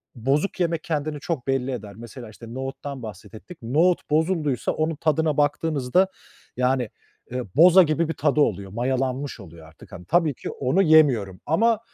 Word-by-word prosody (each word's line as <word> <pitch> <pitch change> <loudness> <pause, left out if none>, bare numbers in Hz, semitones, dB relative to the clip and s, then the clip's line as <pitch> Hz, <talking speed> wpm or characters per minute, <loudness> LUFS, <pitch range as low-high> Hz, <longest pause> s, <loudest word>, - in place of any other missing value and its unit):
bozuk 140 - -1
yemek 170 -2 0
kendini 150 -2 -3
çok 145 -3 -4
belli 135 -1 0
eder. 105 -5 -6
Mesela 120 +1 -10
işte 115 +1 -11
nohuttan 135 +1 -6
bahsettik. 110 - -10
Nohut 160 +12 +1
bozulduysa 155 -3 0
onun 155 +1 -1
tadına 155 0 0
baktığınızda 145 +3 +1 0.5
yani, 125 -2 +1 0.4
eee, 125 0 -3
boza 180 +5 +8
gibi 155 +1 0
bir - - -1
tadı 150 -1 +1
oluyor, 100 -8 0
mayalanmış 130 +4 -2
oluyor 85 -4 -13
artık. 80 0 -17
Hani, 90 - -10
tabii 170 -4 +2
ki - - -7
onu 140 +9 0
yemiyorum 135 - +4
ama 220 +8 +2
140 Hz, 155 wpm, -24 LUFS, 125-160 Hz, 0.5 s, boza